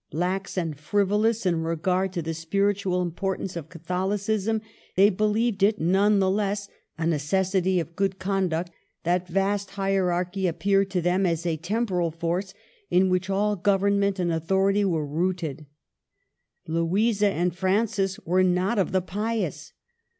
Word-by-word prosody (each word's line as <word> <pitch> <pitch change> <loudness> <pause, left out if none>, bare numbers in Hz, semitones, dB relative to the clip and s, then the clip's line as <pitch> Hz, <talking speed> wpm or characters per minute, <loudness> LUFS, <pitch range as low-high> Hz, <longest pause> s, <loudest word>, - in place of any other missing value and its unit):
Lax 180 +5 -2
and 160 -5 -2
frivolous 205 +6 +1
in 170 -3 +1
regard 180 +3 0
to 170 -3 -2
the 165 +1 -3
spiritual 190 +2 0
importance 190 +2 -3
of 160 -2 -6
Catholicism, 195 +5 -1 0.3
they 200 +3 +6
believed 215 +2 0
it, 210 +2 +3
none 195 +5 +3
the 190 -1 +2
less, 200 0 -1 0.3
a 165 - -2
necessity 185 +4 +1
of 170 0 -5
good 195 0 0
conduct; 185 -3 -1 0.3
that 180 +1 0
vast 195 +2 0
hierarchy 190 -1 0
appeared 195 +3 +1
to 180 -3 -1
them 180 +2 +2
as 170 0 -1
a 165 -2 +1
temporal 180 0 -1
force 170 +4 -3 0.3
in 185 +1 +3
which 185 +1 0
all 205 +2 +1
government 200 +1 +2
and 175 -2 0
authority 195 +5 +2
was 165 -6 0
rooted. 160 -2 -2 1.0
Louisa 200 +6 +1
and 175 -2 -1
Francis 195 +1 0
were 180 +3 +3
not 185 +4 +1
of 190 - 0
the 185 - +3
pious. 215 +4 -3
190 Hz, 145 wpm, -25 LUFS, 175-200 Hz, 1.0 s, they